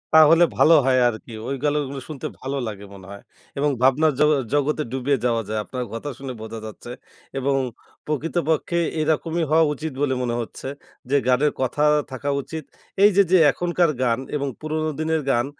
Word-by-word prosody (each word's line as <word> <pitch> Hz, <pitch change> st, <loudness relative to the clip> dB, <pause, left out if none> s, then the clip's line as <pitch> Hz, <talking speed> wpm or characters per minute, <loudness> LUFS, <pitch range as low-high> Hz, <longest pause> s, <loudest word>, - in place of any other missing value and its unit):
তাহলে 160 Hz, +2 st, +7 dB
ভালো 165 Hz, -, +6 dB
হয় 130 Hz, -1 st, +3 dB
আরকি। 110 Hz, +1 st, -8 dB, 0.2 s
ওইগুলো 145 Hz, +2 st, -1 dB, 0.3 s
শুনতে 150 Hz, -5 st, -5 dB
ভালো 135 Hz, +2 st, -4 dB
লাগে 100 Hz, -2 st, -7 dB
মনে 95 Hz, -1 st, -12 dB
হয় 100 Hz, -, -10 dB, 0.4 s
এবং 145 Hz, +1 st, +2 dB
ভাবনার 145 Hz, +4 st, +4 dB
জগ 150 Hz, -, +5 dB, 0.2 s
জগতে 145 Hz, +1 st, +1 dB
ডুবে 130 Hz, +2 st, 0 dB
যাওয়া 115 Hz, -2 st, +1 dB
যায় 110 Hz, 0 st, -2 dB
আপনার 125 Hz, +3 st, -5 dB
কথা 115 Hz, +6 st, -5 dB
শুনে 135 Hz, -1 st, -6 dB
বোঝা 110 Hz, 0 st, -7 dB
যাচ্ছে 110 Hz, +2 st, -9 dB, 0.5 s
এবং 135 Hz, +1 st, +1 dB, 0.5 s
প্রকৃতপক্ষে 160 Hz, +2 st, -1 dB, 0.2 s
এরকমই 160 Hz, +2 st, 0 dB
হওয়া 160 Hz, +1 st, +5 dB
উচিত 155 Hz, +2 st, -5 dB
বলে 140 Hz, -2 st, +1 dB
মনে 120 Hz, -1 st, -1 dB
হচ্ছে 115 Hz, -, -8 dB, 0.4 s
যে 140 Hz, -, +2 dB
গানের 130 Hz, +4 st, +3 dB
কথা 130 Hz, +3 st, 0 dB, 0.3 s
থাকা 135 Hz, +2 st, -4 dB
উচিত। 160 Hz, +3 st, -7 dB, 0.4 s
এইযে 200 Hz, -1 st, +6 dB
যে, 185 Hz, -, +7 dB
এখনকার 175 Hz, -1 st, +1 dB
গান 120 Hz, -1 st, +1 dB, 0.2 s
এবং 140 Hz, -1 st, -1 dB
পুরনো 155 Hz, 0 st, -2 dB
দিনের 160 Hz, 0 st, 0 dB
গান 120 Hz, 0 st, +2 dB
145 Hz, 165 wpm, -23 LUFS, 125-155 Hz, 0.5 s, তাহলে